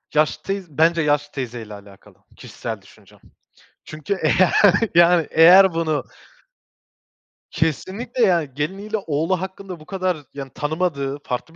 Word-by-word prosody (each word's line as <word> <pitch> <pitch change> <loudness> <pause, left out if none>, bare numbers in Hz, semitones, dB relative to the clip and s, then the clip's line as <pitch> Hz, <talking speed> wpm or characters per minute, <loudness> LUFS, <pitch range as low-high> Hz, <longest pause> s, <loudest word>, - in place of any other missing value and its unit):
Yaşlı 155 0 +1
teyz 195 -7 -5
bence 165 +1 +3
yaşlı 145 -1 0
teyzeyle 120 -5 -6
alakalı. 100 -1 -15 0.2
Kişisel - - -7
düşüncem. - - -21 0.7
Çünkü 155 +5 -5
eğer 175 +4 +3 0.4
yani 170 -1 +5
eğer 180 +2 +7
bunu 160 -3 -1 1.5
Kesinlikle 200 - -2
yani 170 -8 +2
geliniyle 195 +10 -3
oğlu 165 +4 -1
hakkında 190 -1 -8
bu 155 - -15
kadar 185 -2 -2 0.2
yani 135 -2 -8
tanımadığı, 145 -3 -2
farklı 140 +6 -5
165 Hz, 120 wpm, -21 LUFS, 145-185 Hz, 1.5 s, eğer